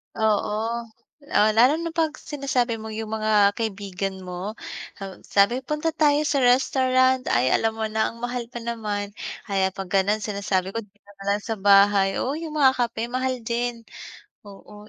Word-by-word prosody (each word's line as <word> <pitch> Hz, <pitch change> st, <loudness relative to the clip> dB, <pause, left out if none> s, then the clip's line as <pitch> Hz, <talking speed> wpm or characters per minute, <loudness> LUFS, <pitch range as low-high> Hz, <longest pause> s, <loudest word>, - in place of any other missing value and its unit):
Oo. 220 Hz, +2 st, 0 dB, 0.5 s
Oh, 210 Hz, +1 st, +5 dB
lalo 250 Hz, +5 st, +6 dB
na 335 Hz, -, -3 dB
'pag 325 Hz, -2 st, 0 dB
sinasabi 260 Hz, -5 st, -2 dB
mo 220 Hz, 0 st, -7 dB
yung 220 Hz, 0 st, -5 dB
mga 215 Hz, -2 st, +4 dB
kaibigan 195 Hz, -3 st, -4 dB
mo, 185 Hz, +3 st, -5 dB, 0.5 s
haw 195 Hz, -1 st, -7 dB
sabi, 235 Hz, +6 st, +2 dB
"Punta 300 Hz, +3 st, -1 dB
tayo 300 Hz, -1 st, +3 dB
sa 290 Hz, -1 st, 0 dB
restaurant." 260 Hz, 0 st, +3 dB
Ay 125 Hz, +2 st, +2 dB
alam 225 Hz, +8 st, +2 dB
mo 220 Hz, 0 st, -4 dB
na 220 Hz, 0 st, +1 dB
ang 230 Hz, -, -14 dB
mahal 245 Hz, 0 st, -3 dB
pa 240 Hz, 0 st, -8 dB
naman, 210 Hz, -3 st, -3 dB, 0.4 s
kaya 190 Hz, -1 st, +1 dB
'pag 195 Hz, -2 st, -7 dB
gano'n 200 Hz, +3 st, +2 dB
sinasabi 200 Hz, -3 st, -1 dB
ko 230 Hz, -, -5 dB
dito 205 Hz, -1 st, -15 dB
na 195 Hz, -, -11 dB
lang 210 Hz, -, -2 dB
sa 225 Hz, 0 st, -4 dB
bahay. 200 Hz, 0 st, +4 dB
Oo, 275 Hz, +4 st, -2 dB
yung 320 Hz, -1 st, -6 dB
mga 275 Hz, -3 st, +5 dB
kape, 230 Hz, 0 st, -5 dB
mahal 255 Hz, 0 st, -2 dB
din. 235 Hz, +1 st, -2 dB, 0.7 s
Oo, 210 Hz, +1 st, -13 dB
220 Hz, 170 wpm, -24 LUFS, 200-250 Hz, 0.7 s, lalo